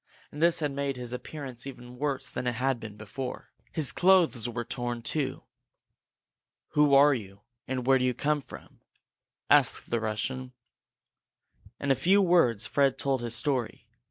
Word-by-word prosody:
And 150 - -8
this 170 0 +3
had 145 -2 0
made 140 -1 -2
his 125 -1 -5
appearance 130 -1 -7
even 125 -2 -10
worse 145 -2 -2
than 125 - -3
it 120 - 0
had 130 +1 0
been 110 -2 -9
before. 125 +5 -7 0.2
His 150 -6 0
clothes 175 - +3
were 120 0 -4
torn, 120 -1 -4
too. 135 -2 -1 1.3
"Who 150 -2 +4
are 145 +1 +7
you, 100 -5 -7 0.3
and 130 -1 -3
where 135 0 +5
do 125 - +1
you 125 -1 0
come 150 +3 0
from?" - - -13 0.7
asked - - +3
the 120 - +1
Russian. 125 +4 -3 1.3
In 140 - 0
a - - +5
few 190 +9 +4
words 165 - +3
Fred 135 +3 +2
told 135 -2 0
his 120 -1 -2
story. 120 -4 -2
130 Hz, 160 wpm, -28 LUFS, 120-145 Hz, 1.3 s, are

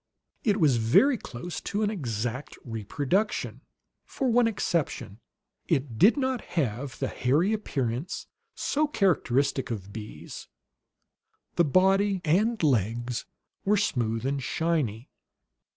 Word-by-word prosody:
It 210 -2 +2
was 145 -8 +4
very 120 - +5
close 175 - -6
to 205 +2 -2
an 210 - +1
exact 125 - -3
reproduction. 140 - -1 0.4
For 260 -3 -1
one 240 0 +4
exception, 165 - -2 0.5
it 130 -5 -1
did 235 - +6
not 260 -2 0 0.2
have 125 -2 -1
the - - -1
hairy 155 - +1
appearance 140 - -2 0.3
so 305 +2 +1
characteristic 140 - +1
of 100 -4 -5
bees; 110 -1 -8 1.1
the 170 - +4
body 195 +5 +3
and 205 +7 +2
"legs" 120 -2 0 0.4
were 205 +2 +3
smooth 115 - 0
and 140 0 -1
shiny. 140 -8 -1
145 Hz, 115 wpm, -27 LUFS, -, 1.1 s, did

